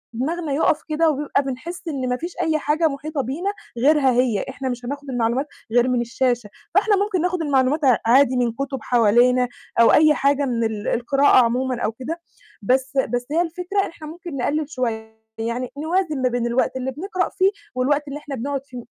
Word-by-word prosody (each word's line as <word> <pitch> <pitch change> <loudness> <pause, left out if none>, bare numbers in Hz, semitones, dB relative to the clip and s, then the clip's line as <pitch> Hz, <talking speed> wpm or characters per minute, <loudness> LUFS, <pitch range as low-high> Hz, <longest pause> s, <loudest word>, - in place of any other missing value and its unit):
دماغنا 305 +4 -2
يوقَف 305 +1 +2
كده 320 +1 +2
وبيبقى 285 -1 0
بنحس 335 +7 -6
إن 265 -5 -2
ما 250 - 0
فيش 345 +4 -6
أي 320 -2 +1
حاجة 310 +3 +1
مُحيطة 290 0 -3
بينا 315 - -2 0.3
غيرها 275 +1 +4
هي، 245 -4 +1
إحنا 265 0 -4
مش 245 0 -5
هناخُد 285 +1 -6
المعلومات 245 +3 0 0.3
غير 245 +1 +4
من 245 -1 +1
الشاشة، 240 -2 -1 0.3
فإحنا 410 +1 +4
ممكن 395 -4 0
ناخُد 360 -1 0
المعلومات 285 0 +1
ع 250 -3 +5
عادي 255 +2 +4
من 240 -2 +1
كتب 275 0 -4
حوالينا 245 +2 +3 0.3
أو 230 - +6
أي 305 0 +6
حاجة 280 +1 +2
من 235 -3 -1
ال 220 -2 -3
القراءة 255 +1 +4
عمومًا 250 +1 -1
أو 215 - 0
كده، 305 +9 -6 0.4
بس 265 +4 +1
بس 245 -2 0
هي 335 +2 +2
الفكرة 360 +4 -2
إحنا 315 -2 -11
ممكن 330 -2 -8
نقلِّل 300 +4 -1
شوية. 220 -4 -4 0.2
يعني 235 +2 -3
نوازن 315 -2 -1
ما 255 - +3
بين 240 -1 -1
الوقت 255 +2 0
اللي 260 +1 -3
بنقرأ 365 +5 -2
فيه 385 +2 +2 0.2
والوقت 290 +3 +1
اللي 290 +2 -5
إحنا 285 -2 -6
بنقعُد 275 +3 -3
ف 255 - -14
275 Hz, 190 wpm, -22 LUFS, 245-310 Hz, 0.4 s, أو